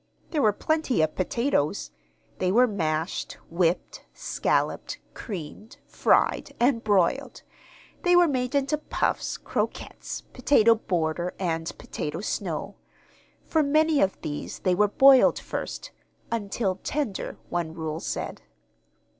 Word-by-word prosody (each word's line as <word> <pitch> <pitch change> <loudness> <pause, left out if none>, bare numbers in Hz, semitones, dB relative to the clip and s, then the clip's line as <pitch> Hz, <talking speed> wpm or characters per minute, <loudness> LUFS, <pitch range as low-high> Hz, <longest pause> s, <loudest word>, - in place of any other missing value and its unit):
There 305 - +1
were 215 - +5
plenty 275 - +1
of 155 - 0
potatoes. 200 - 0 0.5
They 185 0 +1
were 245 +5 +6
mashed, 165 -6 -2 0.2
whipped, 170 0 0
scalloped, - - -1 0.2
creamed, 200 +2 -8
fried, - - +2
and 240 -1 +2
broiled; 215 +6 +1 0.6
they 355 0 +4
were 350 -1 +6
made 255 -2 -1
into 280 +2 +1
puffs, - - -1
croquettes, - - -4
potato 240 -3 +5
border, 175 -5 -2
and 165 -3 -2
potato 150 +2 -5
snow. - - -3 0.7
For 320 - +1
many 310 +1 +3
of 195 0 +1
these 150 -1 -5
they 185 - +1
were 210 +3 +4
boiled 265 +4 +6
first - - -5 0.4
"until 205 -3 -1
tender," 275 -10 -3
one 170 -2 -2
rule 160 -1 -3
said. - - -4
210 Hz, 120 wpm, -26 LUFS, 170-270 Hz, 0.7 s, were